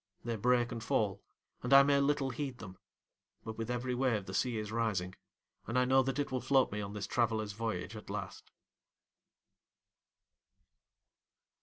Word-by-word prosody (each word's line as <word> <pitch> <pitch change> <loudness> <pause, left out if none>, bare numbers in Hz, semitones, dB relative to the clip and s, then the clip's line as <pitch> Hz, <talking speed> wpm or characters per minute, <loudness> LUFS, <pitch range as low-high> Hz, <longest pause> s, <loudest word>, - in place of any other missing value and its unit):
They 120 -1 -1
break 120 +2 +2
and 115 -1 -5
fall, 100 -3 0 0.4
and 125 - -4
I 140 0 +10
may 140 0 +3
little 140 -1 +1
heed 135 0 -4
them; 95 -5 -10 0.6
but, 110 - -6
with 115 +1 -4
every 125 +1 -1
wave 120 -6 0
the 95 - -7
sea 120 +4 0
is 105 -1 -4
rising, 105 -6 -1 0.5
and 115 +3 -1
I 125 - +4
know 130 +1 +5
that 130 0 -2
it 145 -2 -1
will 130 -1 -1
float 130 0 +3
me 105 +1 -3
on 100 0 -5
this 105 -2 -4
traveller's 110 -3 0
voyage 115 +1 -3
at - - -10
last. - - -6
120 Hz, 165 wpm, -33 LUFS, 110-130 Hz, 0.6 s, I